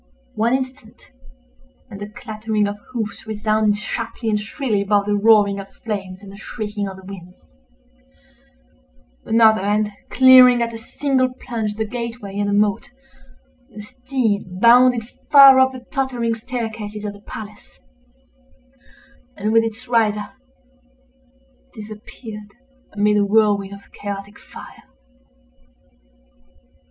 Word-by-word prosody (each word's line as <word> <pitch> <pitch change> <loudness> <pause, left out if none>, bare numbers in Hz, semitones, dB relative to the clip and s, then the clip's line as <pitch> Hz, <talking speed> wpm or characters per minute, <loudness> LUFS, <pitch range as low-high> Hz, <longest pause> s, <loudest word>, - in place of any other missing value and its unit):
One 230 +4 +1
instant, 260 -3 -7 0.8
and 200 - -10
the 205 - -6
clattering 215 -1 -3
of 205 0 -5
hoofs 225 -3 -5
resounded 215 -1 0
sharply 230 +1 -4
and 210 - +1
shrilly 215 0 -2
above 200 0 +1
the 205 0 0
roaring 205 -1 +4
of 195 - -8
the - - -29
flames 195 -3 -6
and 195 - -11
the 200 - -12
shrieking 210 -1 -5
of 190 -1 -8
the 190 - -14
winds—another, - - -4
and, 210 +1 0 0.2
clearing 255 -2 +7
at 230 0 -4
a 225 - -7
single 260 +2 -1
plunge 230 -4 -5
the 220 +1 -2
gate 235 +1 -5
way 200 -2 -7
and 205 0 0
the - - 0
moat, 205 -1 +1 0.8
the 215 -4 -10
steed 220 -6 -3
bounded 240 0 +5 0.2
far 275 -2 +9
up 260 0 +4
the 255 -1 -11
tottering 250 -4 -1
staircases 220 -3 -6
of 205 - -4
the 205 - -15
palace, 210 0 -11 1.6
and, 210 +2 -1
with 225 0 +5
its 225 +3 -6
rider, 215 -3 +1 1.5
disappeared 210 0 -10 0.4
amid 210 +1 +1
the 205 - +3
whirlwind 205 -1 +2
of 200 0 -13
chaotic 200 0 -7
fire. - - -13
215 Hz, 125 wpm, -20 LUFS, 205-235 Hz, 1.6 s, far